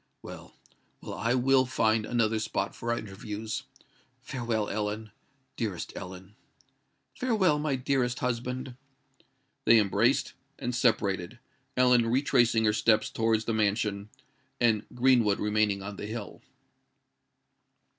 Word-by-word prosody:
"Well—well: - - -12
I 115 +3 0
will 130 +1 +3
find 110 -3 +1
another 115 -2 +1
spot 100 -2 -2
for 115 - -3
our 120 - 0
interviews. 105 +2 -6 0.6
Farewell, 115 -4 -2
Ellen—dearest 110 0 -5
Ellen." 95 +2 -9 0.8
"Farewell, 205 -11 +1
my 150 -2 0
dearest 125 -1 0
husband." 125 +1 -3 0.9
They 115 - +7
embraced, 100 -3 +2 0.2
and 125 - -3
separated—Ellen 120 +3 +1
retracing 120 -3 +3
her 105 - +3
steps 110 0 +2
towards 110 -1 +1
the 115 - -1
mansion, 105 -1 0 0.5
and 110 -3 +2
Greenwood 120 -5 +3
remaining 105 -2 +1
on 100 0 -7
the 105 - -6
hill. 110 -2 -7
115 Hz, 105 wpm, -28 LUFS, 105-125 Hz, 0.9 s, They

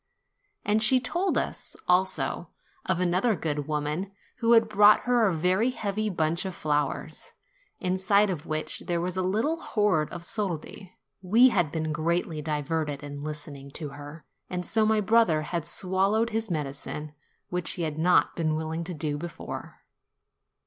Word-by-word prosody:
And 210 +1 +2
she 255 +4 +5
told 350 +9 -1
us, - - -3
also, 185 +1 +1 0.4
of 185 -2 +1
another 185 +6 +2
good 150 -4 -2
woman, 150 +5 -2 0.3
who 230 0 +3
had 225 -1 +6
brought 210 0 +6
her 245 -3 +3
a - - +2
very 185 +8 +2
heavy 215 -3 -2
bunch 165 -2 0
of 190 -2 -5
flowers, 150 -2 -2 0.5
inside 190 +2 +2
of 165 -3 -5
which 155 0 -1
there 175 -1 0
was 180 +1 -2
a 185 - 0
little 220 - 0
hoard 200 -8 +1
of 170 - -7
soldi. 185 -1 -5 0.2
We 225 +8 +6
had 175 -10 +1
been 160 -1 -2
greatly 160 0 -1
diverted 150 -1 -2
in 145 0 -7
listening 145 -2 -7
to 150 -3 -5
her, 145 +2 -10 0.2
and 180 -1 -3
so 220 +2 +2
my 220 -1 +3
brother 200 -7 +3
had 170 0 -3
swallowed 195 +6 +1
his 220 0 -2
medicine, 150 -1 -4 0.4
which 180 -2 -1
he 175 - -3
had 155 -1 -3
not 180 +2 +3
been 155 -2 0
willing 160 +1 -3
to 180 0 -5
do 150 -1 -2
before. 170 +1 -7
175 Hz, 160 wpm, -27 LUFS, 155-210 Hz, 0.5 s, had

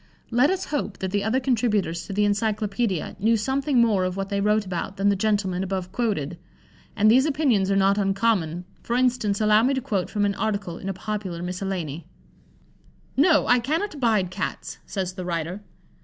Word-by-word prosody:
Let 245 +5 +4
us 380 0 -1
hope 240 -8 -2
that 190 -1 -3
the 205 0 0
other 220 +5 +1
contributors 220 -9 0
to 200 - -5
the 205 +1 +2
Encyclopædia 205 -2 -1
knew 225 +3 +3
something 265 +4 0
more 215 -5 +3
of 185 +1 -2
what 195 0 -3
they 200 0 -1
wrote 210 +1 +2
about 185 +1 -4
than 200 +1 +2
the 200 - +3
gentleman 195 -3 0
above 190 -1 -3
quoted. 175 - -2 0.6
And 215 +1 +5
these 260 +5 +5
opinions 270 -10 +2
are 195 - +2
not 195 +1 +3
uncommon; 195 -4 0 0.2
for 235 - -2
instance, 245 -5 +1
allow 215 0 +4
me 265 +4 +2
to - - 0
quote 205 -9 -2
from 205 -1 0
an 200 - +1
article 200 -5 -3
in 195 - -5
a - - -1
popular 190 -3 -4
miscellany: 180 -4 -4 1.1
"No! 300 +2 +4
I 245 - +4
cannot 315 - -1
abide 220 -10 +1
Cats," - - -5
says 185 -3 -3
the 185 -1 -6
writer. 170 +2 -3
205 Hz, 185 wpm, -24 LUFS, 190-235 Hz, 1.1 s, And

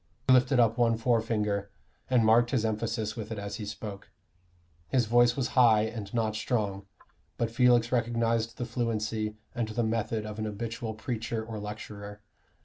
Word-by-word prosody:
He 130 - +7
lifted 125 +1 +4
up 115 0 +3
one 115 -1 +3
forefinger, 110 -4 0 0.4
and 125 -3 +4
marked 120 +2 +5
his 120 -4 +1
emphasis 110 -1 -2
with 110 -1 -6
it 110 - -3
as 100 0 -5
he 105 - -6
spoke. 105 -1 -7 0.8
His 125 -3 +2
voice 120 +2 +4
was 130 - 0
high 115 -5 +5
and 110 -3 -5
not 110 -2 0
strong, 100 -4 -2 0.5
but 115 -1 -1
Felix 120 0 +4
recognized 115 -1 0
the 120 - -3
fluency 110 -3 -2 0.2
and 120 -2 -1
the 110 +2 -1
method 110 -1 -1
of 105 0 -6
an 110 - -2
habitual 110 +1 -4
preacher 115 0 -3
or 110 -1 -6
lecturer. 105 0 -8
115 Hz, 165 wpm, -29 LUFS, 105-120 Hz, 0.8 s, He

